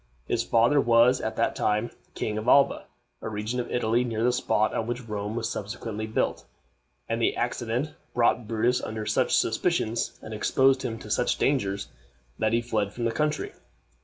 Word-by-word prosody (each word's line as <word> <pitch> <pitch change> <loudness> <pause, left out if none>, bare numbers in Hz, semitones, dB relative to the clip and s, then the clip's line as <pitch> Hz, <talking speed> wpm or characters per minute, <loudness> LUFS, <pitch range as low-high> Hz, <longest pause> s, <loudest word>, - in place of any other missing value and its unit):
His 115 - 0
father 120 +6 +3
was 120 +2 +4
at - - -3
that - - 0
time 105 +2 0 0.2
King 105 0 -2
of 110 - -6
Alba 140 +2 +4 0.3
a - - -4
region 110 +4 -3
of 120 - -3
Italy 120 0 +1
near 115 -2 -2
the 125 +1 +3
spot 110 -3 +1
on 115 - -2
which 120 0 -4
Rome 105 0 -4
was 115 -1 -1
subsequently 110 0 -5
built 110 - -1 0.6
and 115 0 -1
the - - +2
accident 120 +4 -2 0.2
brought 120 -1 +2
Brutus 115 +2 +1
under 110 0 -4
such - - +2
suspicions, 115 -2 0
and 110 - -7
exposed 130 +5 +3
him 115 -3 -3
to 105 - -9
such 120 - +1
dangers, 100 -8 0 0.5
that 110 0 +1
he 115 +1 +2
fled 105 -4 -1
from 120 - -3
the 115 - +1
country. 150 +5 -1
115 Hz, 180 wpm, -26 LUFS, 110-125 Hz, 0.6 s, was